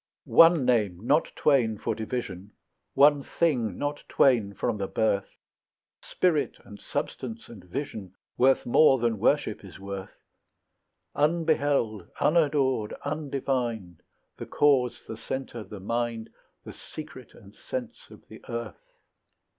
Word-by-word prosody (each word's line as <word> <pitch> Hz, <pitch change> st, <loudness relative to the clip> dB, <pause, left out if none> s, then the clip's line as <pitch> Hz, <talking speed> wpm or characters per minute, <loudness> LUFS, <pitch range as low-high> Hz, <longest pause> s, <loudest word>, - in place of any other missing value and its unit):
One 165 Hz, -4 st, +6 dB
name, 105 Hz, -6 st, +1 dB
not 145 Hz, +5 st, +2 dB
twain 120 Hz, -7 st, +2 dB
for 110 Hz, -, -2 dB
division; 105 Hz, -3 st, -5 dB, 0.4 s
One 145 Hz, +1 st, +6 dB
thing, 125 Hz, -, 0 dB
not 145 Hz, 0 st, -3 dB
twain, 110 Hz, -7 st, +3 dB
from 120 Hz, -3 st, -1 dB
the 100 Hz, -1 st, -3 dB
birth; 100 Hz, -2 st, 0 dB, 0.7 s
Spirit 170 Hz, -5 st, 0 dB
and 100 Hz, -, -12 dB
substance 115 Hz, -3 st, -5 dB
and 105 Hz, -6 st, -12 dB
vision, 100 Hz, -4 st, -6 dB, 0.2 s
Worth 130 Hz, +1 st, +3 dB
more 135 Hz, +2 st, +5 dB
than 115 Hz, -3 st, 0 dB
worship -, -, +1 dB
is -, -, -12 dB
worth; 100 Hz, -1 st, -8 dB, 0.9 s
Unbeheld, 145 Hz, -, +1 dB
unadored, 140 Hz, -8 st, +2 dB
undivined, 130 Hz, -, -3 dB, 0.4 s
The -, -, -7 dB
cause, 135 Hz, -4 st, +2 dB
the 110 Hz, -, -6 dB
centre, 130 Hz, -2 st, -5 dB
the 105 Hz, 0 st, -10 dB
mind, 115 Hz, +2 st, -3 dB, 0.3 s
The -, -, -9 dB
secret 145 Hz, -6 st, -11 dB
and 100 Hz, 0 st, -16 dB
sense 125 Hz, 0 st, -7 dB
of -, -, -16 dB
the -, -, -13 dB
earth. 115 Hz, -4 st, -5 dB
120 Hz, 125 wpm, -27 LUFS, 105-145 Hz, 0.9 s, One